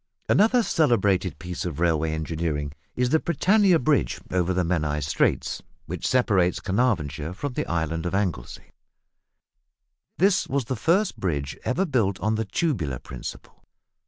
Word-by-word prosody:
Another 230 +3 +4
celebrated 100 - +2
piece 90 +1 -5
of 85 -5 -4
railway 80 -2 +1
engineering 80 -2 -3 0.2
is 125 0 0
the 160 - +4
Britannia 190 +2 +3
Bridge 140 - +1
over 90 0 +1
the 90 0 +1
Menai 75 -4 0
Straits, 75 - 0 0.2
which - - -4
separates 100 -8 +2
Caernarvonshire 90 - -1
from 140 +5 -4
the - - -2
island 80 0 -1
of 85 - -2
Anglesey. 90 -12 -3 1.5
This 190 +1 +3
was 135 -2 -1
the 130 - -2
first 175 - +1
bridge 70 -6 -2
ever 175 +10 0
built 115 - 0
on 110 +2 0
the 110 0 -1
tubular 100 - -1
principle. 65 0 -9
95 Hz, 140 wpm, -25 LUFS, 80-130 Hz, 1.5 s, Another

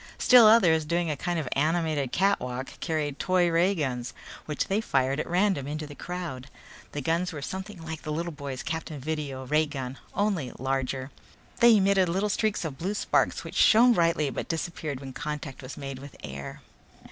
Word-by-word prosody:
Still 245 -3 +7
others, 175 -8 +5
doing 170 +1 0
a - - -1
kind 175 +5 -2
of 155 -5 -2
animated 155 -3 0
cakewalk, 135 -10 -1
carried 150 -4 -2
toy 185 -1 +2
ray 175 +4 +3
guns 125 -6 -3 0.3
which 150 -2 -1
they 200 +3 +1
fired 135 -6 +1
at - - -3
random 180 -5 +1
into 150 +1 -4
the 145 - -9
crowd. 165 -5 -6 0.5
The 145 - -3
guns 170 +5 0
were 150 -4 -6
something 190 0 -6
like 160 -1 -5
the 155 - -5
little 170 +3 -2
boy's 140 -4 -6
Captain 160 -2 -4
Video 140 -2 -4
ray 150 +4 +2
gun, 135 -3 -6 0.2
only 200 -10 0
larger. 135 0 -2 0.5
They 235 -2 +7
emitted 195 -2 +3
little 195 +5 0
streaks 210 -3 0
of 140 -4 -5
blue 195 +5 -2
sparks - - +1
which - - -8
shone 240 +3 +6
brightly 165 -6 +2
but - - -4
disappeared 160 -4 -3
when 135 -1 -8
contact 150 -1 -5
was 130 +1 -8
made 135 -2 -6
with 140 +1 -11
air. 70 -1 -7
155 Hz, 180 wpm, -27 LUFS, 135-180 Hz, 0.5 s, Still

